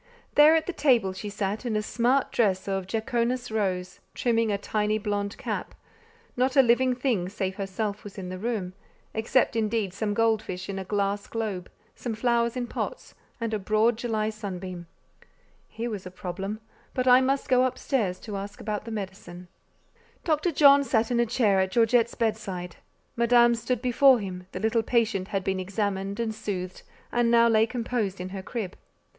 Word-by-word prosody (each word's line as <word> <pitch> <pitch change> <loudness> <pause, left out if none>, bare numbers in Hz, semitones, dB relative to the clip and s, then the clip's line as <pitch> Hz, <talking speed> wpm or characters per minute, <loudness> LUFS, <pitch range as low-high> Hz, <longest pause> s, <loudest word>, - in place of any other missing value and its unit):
There 300 +2 +7
at 320 - +1
the 365 - -3
table 235 - +3
she 205 +2 -6
sat 205 +2 -3
in 235 -3 -2
a 215 - 0
smart 245 +5 +1
dress 195 -5 +1
of 195 -1 -2
"jaconas 235 +3 -1
rose," 185 -4 -2 0.2
trimming 230 -2 +1
a 200 - +1
tiny 210 +1 0
blond 205 -1 -2
cap: - - -4 0.6
not 255 +1 +1
a 270 - +7
living 250 +1 +3
thing 240 -9 0
save 190 -1 -3
herself 200 +1 -3
was 205 -1 -10
in 185 -2 -5
the 185 0 -6
room, 205 -5 -2 0.4
except 230 +2 +1
indeed 215 -3 0
some 205 +1 -2
gold 225 -1 +3
fish 185 +1 -6
in 195 -1 -3
a - - -4
glass 200 +1 -1
globe, 210 -6 -4 0.2
some 235 -3 -5
flowers 235 +1 +1
in 245 - -1
pots, - - -5 0.3
and 230 -1 -2
a 215 - 0
broad 215 +4 +2
July 220 -2 -1
sunbeam. 185 -4 -6 0.8
Here 230 +2 -4
was 195 -4 -5
a - - -6
problem: 195 +4 -5 0.3
but 255 0 0
I 250 +1 +7
must 270 +1 0
go 255 -1 +4
up 255 - 0
stairs 210 -10 -1
to 210 -3 -6
ask 200 +1 -7
about 210 0 -4
the - - -6
medicine. 190 -4 -7 0.7
Dr. 315 +2 +1
John 280 -2 +6
sat 230 -3 +1
in 240 - +2
a 240 - +3
chair 215 -4 +2
at 190 0 +1
Georgette's 235 +2 +3
bedside; 195 -6 -3 0.4
Madame 235 0 +5
stood 235 +1 -2
before 255 +1 +6
him; 185 -4 -6
the - - -5
little 225 +1 +2
patient 220 -5 +1
had 195 -2 -2
been 190 0 -1
examined 200 +1 -2
and 225 -1 -1
soothed, 185 -4 -5 0.3
and 240 -1 +2
now 235 0 +6
lay 220 -1 +4
composed 230 -5 -2
in 180 +1 -5
her 190 0 -6
crib. 205 -2 -5
220 Hz, 185 wpm, -26 LUFS, 195-240 Hz, 0.8 s, There